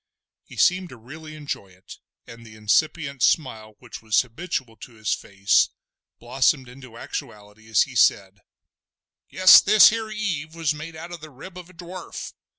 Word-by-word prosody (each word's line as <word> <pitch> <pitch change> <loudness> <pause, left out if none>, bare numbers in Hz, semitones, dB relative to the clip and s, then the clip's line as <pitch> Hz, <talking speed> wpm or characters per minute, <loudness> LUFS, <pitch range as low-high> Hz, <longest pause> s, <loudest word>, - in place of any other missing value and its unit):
He - - -15
seemed 185 -1 +2
to 125 - -12
really 155 +7 -12
enjoy 145 -9 -6
it, 95 +1 -15 0.3
and 115 0 -13
the 110 -1 -14
incipient 140 +6 -1
smile 110 -8 0
which 120 0 -11
was 110 -1 +2
habitual 125 -2 -6
to 120 - -13
his 110 -1 -2
face 100 +1 +1 0.5
blossomed 130 +2 0
into 125 -2 -14
actuality 105 -1 -9
as 110 - +4
he - - -11
said: - - +2 0.9
"Guess 185 0 +8
this 210 -1 +7
here 225 0 -4
Eve 180 -8 -4
was 165 -2 -1
made 155 +2 -9
out 165 +2 -9
of 175 -3 -9
the 155 - -11
rib 150 +7 -13
of 180 -1 -11
a - - -17
dwarf! 175 +1 -9
140 Hz, 165 wpm, -23 LUFS, 110-170 Hz, 0.9 s, Guess